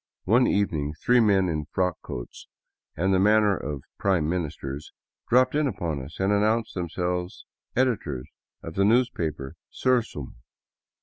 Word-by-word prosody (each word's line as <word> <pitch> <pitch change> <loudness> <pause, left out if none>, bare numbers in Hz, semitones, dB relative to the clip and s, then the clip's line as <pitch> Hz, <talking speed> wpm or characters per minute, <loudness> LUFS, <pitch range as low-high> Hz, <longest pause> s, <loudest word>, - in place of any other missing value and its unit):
One 120 +6 +4
evening 80 -7 0
three 125 +6 +4
men 100 -4 +4
in 75 -3 -2
frock 90 +2 -1
coats - - -8 0.5
and 95 +4 +2
the 95 - +4
manners 105 0 +4
of 75 -3 -4 0.2
prime 95 -6 +2
ministers 75 -4 -4 0.4
dropped 125 +2 +4
in 150 0 +2
upon 85 - -3
us 70 +5 -10
and 95 +2 +2
announced 110 +2 +1
themselves 90 0 -3 0.3
editors 100 - 0 0.4
of 80 - -7
the 100 - +2
newspaper 90 - +1
" - - -67
Sursum." 115 - 0
95 Hz, 140 wpm, -26 LUFS, 75-110 Hz, 0.5 s, One